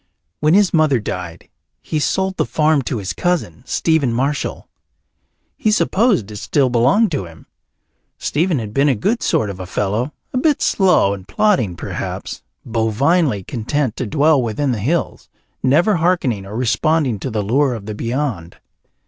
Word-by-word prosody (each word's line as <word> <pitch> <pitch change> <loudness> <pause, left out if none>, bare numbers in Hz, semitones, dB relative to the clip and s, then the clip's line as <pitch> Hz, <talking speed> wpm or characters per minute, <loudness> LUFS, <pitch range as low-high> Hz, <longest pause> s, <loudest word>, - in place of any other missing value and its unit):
When 155 +3 +3
his 200 -2 +3
mother 155 -6 +3
died 90 -5 -6 0.3
he 155 - -3
sold 190 +5 0
the - - +1
farm 150 +4 +2
to 125 - -2
his 95 -3 -4
cousin, 175 - -1
Stephen 160 -6 +1
Marshall. 135 +5 -2 0.9
He 215 - +1
supposed 210 - +2
it 105 - -7
still 130 +4 +1
belonged 135 - +3
to 140 - -2
him. 80 -1 -14 0.7
Stephen 165 +2 0
had 110 -4 -5
been 140 +4 +3
a 135 - +2
good 210 - 0
sort 105 -2 0
of 95 - -10
a 90 - -6
fellow, 105 +9 -1 0.2
a 255 - +1
bit 295 +1 +2
slow 180 - +3
and 95 -1 -9
plodding, 125 - +1
perhaps, - - -5 0.2
bovinely 115 - +1
content 120 +3 -2
to 130 - -3
dwell 150 +3 +3
within 125 +4 -1
the 115 - -2
hills, 160 - -2 0.3
never 170 +10 +3
hearkening 150 - 0
or 105 - -7
responding 130 0 +1
to 130 - -4
the 110 -3 -2
lure 130 +5 +1
of 105 -3 -8
the 110 - -5
beyond. 115 - -3
130 Hz, 165 wpm, -19 LUFS, 110-160 Hz, 0.9 s, When